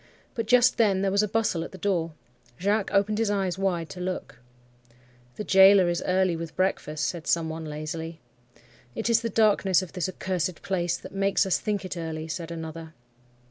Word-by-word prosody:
But 230 -2 -3
just 250 +1 +5
then 195 -4 +3
there 195 - +1
was 200 +1 +3
a 210 - 0
bustle 210 -6 0
at - - -8
the 190 - -10
door. 170 -4 -1 0.5
Jacques 200 +2 +1
opened 210 +2 +2
his 225 -2 +1
eyes 190 -3 -1
wide 175 -4 0
to 180 - -9
look. 180 -9 -5 1.0
"'The - - -4
gaoler 190 -2 +6
is 175 - -1
early 185 -1 +2
with 165 0 -7
breakfast,' 155 -5 -1
said 170 -3 -4
some 165 -1 +1
one, 160 0 -6
lazily. 160 +2 -6 0.8
"'It 235 - -1
is 230 0 +4
the 230 - -2
darkness 200 -4 +3
of 185 - -10
this 180 -1 -2
accursed 185 -2 -3
place 175 -3 -1
that - - -11
makes 195 0 +2
us 190 - +1
think 205 -3 -2
it 185 - -5
early,' 160 -1 -4
said 165 +1 -5
another. 160 -1 -7
185 Hz, 190 wpm, -26 LUFS, 165-200 Hz, 1.0 s, gaoler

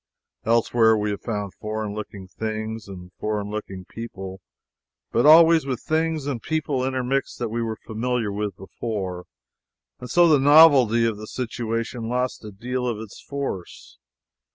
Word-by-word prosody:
Elsewhere 115 0 +4
we 105 0 -1
have 100 - -5
found 105 -4 -4
foreign 110 -1 -4
looking 100 -2 -7
things 110 +1 -5
and 90 -2 -10
foreign 105 -1 -2
looking 95 -3 -6
people, 95 -4 -8 0.7
but 120 +5 +3
always 160 -1 +7
with 130 -3 -2
things 160 -1 -1
and 135 -5 -3
people 150 -4 -1
intermixed 130 +1 -1
that 120 -2 -3
we 115 +2 -2
were 115 -1 -2
familiar 115 -1 -1
with 105 0 -3
before, 95 -3 -5 0.7
and 125 - -8
so 175 -1 +5
the 155 -3 +5
novelty 135 -6 +6
of 115 -2 0
the 110 +1 -8
situation 115 -1 -3
lost 125 0 -2
a 105 - -7
deal 125 +5 -3
of 120 -3 -1
its 110 -1 -10
force. 135 - -6
115 Hz, 155 wpm, -24 LUFS, 105-130 Hz, 0.7 s, always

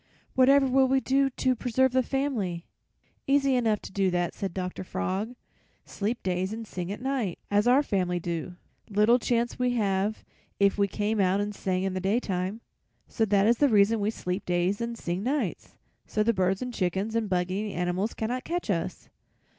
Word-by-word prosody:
'Whatever 270 +2 +5
will 265 0 +4
we 265 +1 +3
do 270 +1 +2
to 255 0 0
preserve 255 +2 +1
the 260 0 +3
family?' 235 -11 -2 0.6
"'Easy 275 -1 +3
enough 225 -4 +2
to - - -8
do 195 -1 +1
that,' 175 -1 -1
said 195 - -4
Dr. 185 0 -4
Frog. 200 +6 -3 0.5
'Sleep 215 +4 -3
days 185 +1 -1
and 225 +1 -5
sing 180 -3 -5
at 210 - -6
night 260 -10 -1
as 205 +2 +3
our 260 +4 +5
family 180 -6 0
do; 170 +1 -4 0.3
little 210 +4 +4
chance 235 0 0
we 250 - +2
would 245 - -1
have 200 0 0 0.3
if 200 0 +3
we 200 - +4
came 210 +2 -1
out 190 0 +3
and 205 0 -2
sang 185 -2 -1
in 190 -1 -1
the 185 - -2
daytime.' 195 0 -1 0.5
"So 225 - 0
that 200 -1 +3
is 235 +2 +3
the 290 - +5
reason 215 0 +4
we 205 +1 +1
sleep 185 -3 -3
days 180 +4 0
and 235 0 -3
sing 175 -2 -3
nights, 275 +7 -2 0.3
so 215 - 0
the 230 +2 +2
birds 190 +2 0
and 250 -1 -5
chickens 190 +3 -1
and 225 -3 0
bug 180 -1 0
eating 205 +2 -2
animals 180 +5 -1
cannot 245 +4 -2
catch 345 -9 -2
us. 165 -3 -3
210 Hz, 195 wpm, -27 LUFS, 185-245 Hz, 0.6 s, Whatever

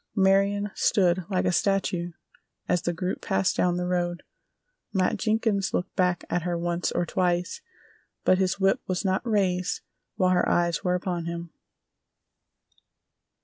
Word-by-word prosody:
Marion 200 +1 +3
stood 180 -2 +2
like 185 -1 0
a 180 - +3
statue 180 -2 0 0.5
as 180 -1 +1
the 175 - -1
group 180 +2 -3
passed 190 -1 +1
down 180 -1 +1
the 180 - -1
road. 175 -1 -1 0.7
Matt 185 -2 +1
Jenkins 215 -3 0
looked 180 - -3
back 180 -1 +1
at 175 - -1
her 175 +1 -2
once 175 +1 -1
or 175 - 0
twice, 175 0 -1 0.6
but 185 - +4
his 190 +1 0
whip 195 0 +2
was 185 +2 -2
not 190 0 +1
raised 190 -5 0 0.3
while 185 -3 +2
her 180 - +2
eyes 170 -1 +1
were 180 -1 +1
upon 180 -2 -3
him. 170 0 -5
180 Hz, 145 wpm, -26 LUFS, 175-195 Hz, 0.7 s, but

